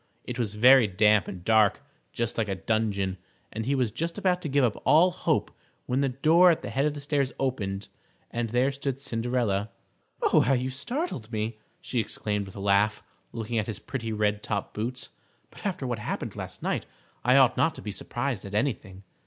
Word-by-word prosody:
It 125 0 -5
was 105 -3 -2
very 125 +1 +7
damp 105 0 +3
and 90 -1 -8
dark, 110 -2 +4 0.3
just 115 -1 -2
like 110 -2 0
a 95 - -1
dungeon, 100 -3 -1 0.3
and 110 +2 -4
he 140 - +2
was 125 -5 +1
just 165 - -3
about 185 -3 +1
to 160 - -4
give 140 0 +3
up 115 -4 +2
all 170 +4 +5
hope - - -1 0.3
when 130 +2 0
the 140 - +2
door 160 +8 +5
at 165 - +1
the - - -5
head 135 +2 +1
of 150 - -2
the 145 - -6
stairs 140 -2 0
opened, 105 -7 -2 0.4
and 120 -1 -2
there 125 +4 +2
stood 135 -1 -3
Cinderella. 115 -5 -1 0.6
"How 135 - +4
you 130 0 0
startled 140 - -4
me!" 110 0 -3 0.2
she 125 - -2
exclaimed, 105 -2 -2
with 95 - -12
a - - -7
laugh, 100 +2 +2 0.3
looking 115 0 -2
at 105 - -2
his 110 -3 -4
pretty 115 0 -5
red 105 -1 0
top 100 -2 -3
boots. 120 +2 -4 0.4
"But - - -5
after 180 -8 -3
what 120 -3 -2
happened 105 - -4
last - - -7
night - - -1 0.4
I 125 +2 +5
ought 135 -3 +5
not 165 - +2
to - - -8
be 105 - -4
surprised 120 +3 -3
at 100 0 -7
anything." 105 -5 -2
115 Hz, 200 wpm, -27 LUFS, 105-135 Hz, 0.6 s, very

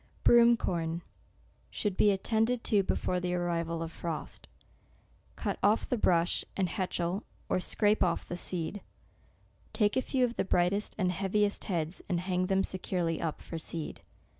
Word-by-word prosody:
SEPTEMBER. 240 - +6
181 235 0 +7 0.3
BROOM - - -2
CORN - - -8 0.7
should 205 -3 -2
be 210 - +5
attended 225 +4 +1
to 210 -3 +3
before 180 -1 -1
the 180 0 -1
arrival 170 -1 -1
of 165 - -6
frost. 165 -2 -6 0.9
Cut - - -3
off 210 +2 +3
the - - +1
brush, 175 -3 +2
and 190 -2 +1
hetchel 180 +1 -1 0.3
or - - +2
scrape 210 +3 +2
off 170 -2 0
the 175 - -4
seed. 180 +2 -3 0.9
Take 210 -2 +2
a 260 - +3
few 255 -1 +1
of 240 -1 -5
the - - +2
brightest 185 +3 +1
and 185 -3 +1
heaviest 200 +3 0
heads, 170 -2 -2
and 175 -3 +1
hang 185 0 0
them 195 0 +2
securely 180 -3 -2
up 160 -2 -3
for 165 - -6
seed. 160 0 -4
185 Hz, 165 wpm, -30 LUFS, 170-205 Hz, 0.9 s, 181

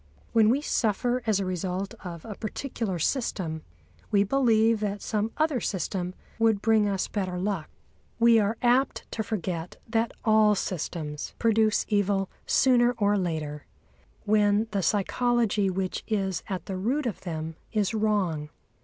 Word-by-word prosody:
When 220 -2 +5
we 265 +5 +2
suffer 245 -1 0
as 210 -3 +3
a 195 - -1
result 185 +3 -3
of 170 -3 -7
a 220 - -5
particular 215 -2 -4
system, 170 - -1 0.5
we 200 -1 +4
believe 225 -2 +3
that 205 -1 -2
some 215 +2 -1
other 305 -5 +1
system 185 -1 -2 0.2
would 225 -2 +3
bring 215 -1 +3
us 195 -2 -1
better 185 -3 -3
luck. 185 -4 -2 0.5
We 235 -1 +6
are 210 +2 0
apt 250 +3 +2
to 220 - -2
forget 180 -6 -4
that 225 0 0
all 215 -1 +5
systems 155 -5 -4
produce 220 -2 +2
evil 200 -2 +1 0.2
sooner 245 -2 +4
or 205 -2 +2
later, 155 -6 -3 0.6
when 210 +1 +3
the 200 - 0
psychology 215 +1 +1
which 185 0 -2
is 195 -5 -1
at 190 -2 -3
the 190 - -4
root 255 +10 0
of 235 - -3
them 160 -2 -5 0.2
is 210 -1 0
wrong. 200 -9 0
205 Hz, 145 wpm, -27 LUFS, 185-225 Hz, 0.6 s, We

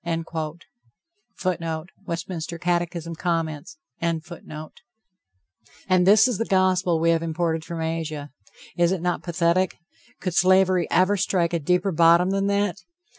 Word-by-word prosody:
[Footnote: 165 -2 -3 0.2
Westminster 170 0 -4
Catechism, 175 -1 -2
Comments.] 160 -3 -3 0.2
And 165 -2 -1 1.7
this 195 +5 +6
is 245 -6 -2
the 230 - 0
Gospel 185 -3 +2
we 165 +1 +3
have 165 -1 +1
imported 165 0 -1
from 170 0 -5
Asia! 160 -3 -4 0.4
Is 175 0 +3
it 190 -3 -1
not 180 -1 0
pathetic? 175 +1 +1 0.4
Could 185 -2 -3
slavery 185 0 +4
ever 195 +2 +3
strike 180 -3 0
a 170 - +1
deeper 180 +5 +1
bottom 170 +2 +5
than 195 0 0
that? 200 -2 0
175 Hz, 125 wpm, -24 LUFS, 165-185 Hz, 1.7 s, this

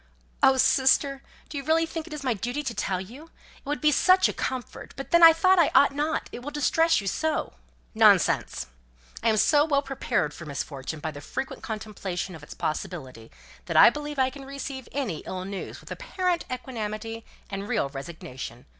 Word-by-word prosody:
"Oh, 265 - +6
sister! 270 +1 +3 0.3
do 295 - -5
you - - -7 0.2
think 325 0 -6
it - - -12
is 300 - -6
really 255 -3 +1
my 205 - -10
duty 245 +7 -3
to 255 -5 -3
tell 190 -4 -1
you? 240 - -10 0.3
it - - -26
would 295 +1 -2
be 305 -1 +4
such 370 +5 +5
a - - -3
comfort; 255 -3 -5
but 275 - -7
then 340 - +5
I 330 -1 +11
thought 370 +3 +4
I 330 - +5
ought 280 - +6
not; 300 +3 -1
it 245 - -7
will 275 - -5
distress 325 +1 +2
you - - -9
so." 315 +11 -1 0.4
"Nonsense. - - +3 0.6
I 230 - +2
am 215 - +2
so 290 +7 +5
well 285 -2 +1
prepared 245 - -1
for 170 - -10
misfortune 140 +1 -5
by 160 - -3
the 145 -1 -10
frequent 265 - -5
contemplation 200 -4 -5
of 160 - -10
its 150 - -11
possibility 130 -6 -5 0.4
that - - 0
I - - +9
believe 295 +1 -6
I 260 -1 +2
can 275 +1 -10
receive 270 -2 -7
any 240 - -2
ill 185 0 -6
news 195 0 -6
with - - -14
apparent 365 -8 -2
equanimity 225 -3 -5 0.3
and 195 +1 -4
real 140 - 0
resignation. 135 -4 -8
255 Hz, 195 wpm, -26 LUFS, 190-295 Hz, 0.6 s, I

